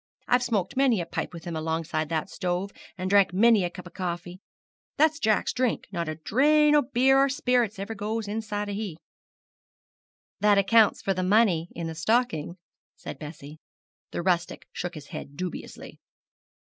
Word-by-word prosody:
I've 245 0 +3
smoked 215 -7 -1
many 260 -5 +3
a 170 - -2
pipe - - -4
with 170 0 -10
him 170 -2 -4
alongside 160 -1 -2
that 160 +1 -1
stove, 185 +1 -3 0.3
and 185 0 -3
drank 195 -1 +4
many 220 +1 +5
a 175 - -1
cup 180 0 -11
o' 175 - -11
coffee. 180 -1 -5 0.6
That's 315 +1 +3
Jack's 215 -5 +1
drink 250 -2 0
not 170 -4 -3
a 155 - -3
drain 295 - +3
o' 295 - +6
beer 265 +1 +3
or 275 0 +4
sperrits 250 -5 +1
ever 200 +3 -5
goes 215 +1 -3
inside 210 -1 -3
o' 205 - -4
he.' 200 -6 -4 1.4
'That 210 -1 +4
accounts 205 +2 +4
for 195 - +1
the 185 - -2
money 185 -4 +3
in 170 - -4
the 165 - -4
stocking,' 170 -2 0 0.4
said - - -9
Bessie. 150 0 -10 0.5
The 175 - -4
rustic 175 -2 0
shook 175 0 -5
his 150 -2 -10
head 140 0 -8
dubiously. 180 -1 -7
195 Hz, 170 wpm, -26 LUFS, 170-230 Hz, 1.4 s, o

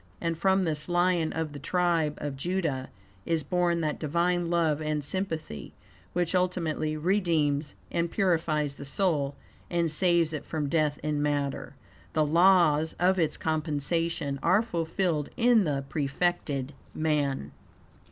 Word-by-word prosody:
And 165 -1 -1
from 190 +3 +2
this 155 -1 -2
lion 175 -2 +2
of 160 -2 -3
the 145 - -7
Tribe 165 -1 +1
of 145 -2 -4
Judah, 150 -4 -2 0.3
is 165 -2 0
born 175 +2 +1
that 155 -2 -2
Divine 170 +3 0
love 160 -3 +1
and 155 -1 -1
sympathy 160 - -4 0.4
which 175 0 0
ultimately 165 -4 0
redeems 155 -5 +1 0.2
and 170 0 0
purifies 160 -7 0
the - - -7
soul 140 -2 0 0.3
and 170 -2 +1
saves 170 -1 +2
it 155 - -4
from 150 -3 -3
death 150 -2 +1
in 150 -1 0
matter. 145 -2 -2 0.4
The 155 -1 +3
laws 165 -1 +4
of 185 +2 +2
its 160 -3 +1
compensation 155 -1 -1
are 200 +4 +4
fulfilled 165 -5 -1
in 235 -4 +4
the 140 -3 -1
prefected 145 -2 -1 0.2
man. 150 -3 0
160 Hz, 135 wpm, -28 LUFS, 150-175 Hz, 0.4 s, laws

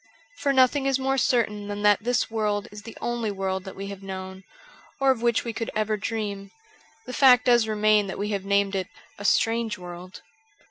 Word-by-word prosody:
For 285 -1 +1
nothing 270 +1 +3
is 270 -1 +2
more 270 0 0
certain 210 -4 0
than 205 0 -5
that 205 -1 +5
though - - -22
this 245 -2 0
world 210 -2 -1
is 210 0 -9
the 225 +2 -11
only 240 -2 -2
world 190 -1 -3
that 190 - -8
we 195 - -6
have 200 -1 -8
known, 190 0 -7 0.6
or 270 -1 +4
of 245 -3 -2
which 235 -1 +2
we 235 - -4
could 230 +1 -4
ever 215 0 0
dream, 205 -2 -4 0.6
the 250 - -7
fact 255 -2 +6
does 240 -3 +4
remain 215 -1 +3
that 190 - -5
we 205 +1 -2
have 200 -2 -2
named 200 0 +1
it 190 -2 -2 0.2
' - - -24
a - - -7
strange 225 +2 +1
world.' 180 +1 -10
210 Hz, 215 wpm, -25 LUFS, 200-240 Hz, 0.6 s, fact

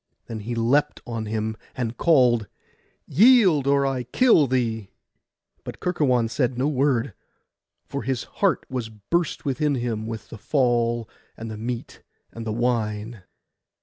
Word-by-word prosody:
Then 115 -1 -6
he 115 +3 -4
leapt 135 +6 +1
on 115 -2 -4
him, 110 0 -2 0.2
and 120 -2 -2
called, 125 -8 +3 0.6
'Yield, 190 - +5
or 140 0 +3
I 135 -2 -1
kill 155 - +4
thee!' 115 -5 -1 0.7
but - - -8
Kerkuon 130 -10 +1
said 120 +1 -1
no 130 +3 +1
word; 135 -5 +1 0.7
for - - -4
his 130 0 -2 0.2
heart 195 -3 +2
was 125 -4 -4
burst 145 - -2
within 145 +1 0
him 115 -3 -3
with 110 -2 -7
the 110 - -10
fall, 120 -2 +1 0.3
and 115 0 -6
the - - -5
meat, 120 +1 -5 0.3
and 115 -1 -7
the - - -1
wine. 110 -2 -1
120 Hz, 145 wpm, -24 LUFS, 115-140 Hz, 0.7 s, Yield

